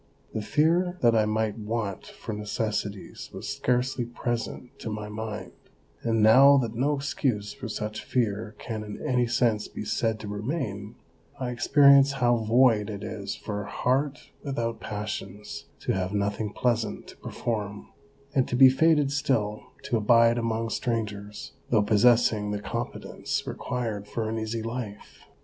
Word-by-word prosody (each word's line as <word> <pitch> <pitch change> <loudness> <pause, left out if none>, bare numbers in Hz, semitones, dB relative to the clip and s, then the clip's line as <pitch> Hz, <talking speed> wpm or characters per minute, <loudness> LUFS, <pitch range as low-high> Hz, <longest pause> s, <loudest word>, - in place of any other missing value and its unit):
The 110 - -2
fear 170 - +2
that 120 -1 +6
I 110 -1 +4
might 110 0 -1
want 105 -3 -3
for - - -7
necessities 105 -1 -3
was - - -7
scarcely 130 -2 0
present 120 +1 -4
to - - -5
my 105 -1 -5
mind, 110 0 -5 0.5
and 115 -2 +1
now 135 +6 +8
that 120 -4 0
no 140 +5 +1
excuse 130 -7 -1
for 125 - -7
such 105 0 -4
fear 110 -3 -1
can 110 -2 -5
in 105 -1 -7
any 125 -1 +2
sense 115 -3 +1
be - - -7
said 110 -2 0
to 105 - -6
remain, 105 -1 -4 0.4
I 125 -2 -2
experience 140 +3 +6
how 120 -3 +3
void 115 -1 +3
it 100 -2 -6
is 100 -2 -4
for 105 -1 -4
a 100 - -9
heart 135 +3 -1
without 120 -5 -2
passions 105 -1 -6 0.2
to - - -1
have 95 +1 -2
nothing 100 +1 -1
pleasant 115 -1 -1
to - - -13
perform, 105 -3 -4 0.4
and 130 -2 +2
to - - -2
be 130 +1 +9
fated 150 +1 +3
still 115 -7 0 0.2
to 135 -4 0
abide 115 +2 +5
among 115 0 -1
strangers, 105 -4 -3 0.2
though 110 -3 +4
possessing 110 0 +4
the 105 0 -2
competence 115 +3 -4
required 110 -5 -3
for 110 0 -3
an 115 0 -2
easy 110 +1 -3
life. 115 -3 -7
115 Hz, 155 wpm, -27 LUFS, 105-125 Hz, 0.5 s, be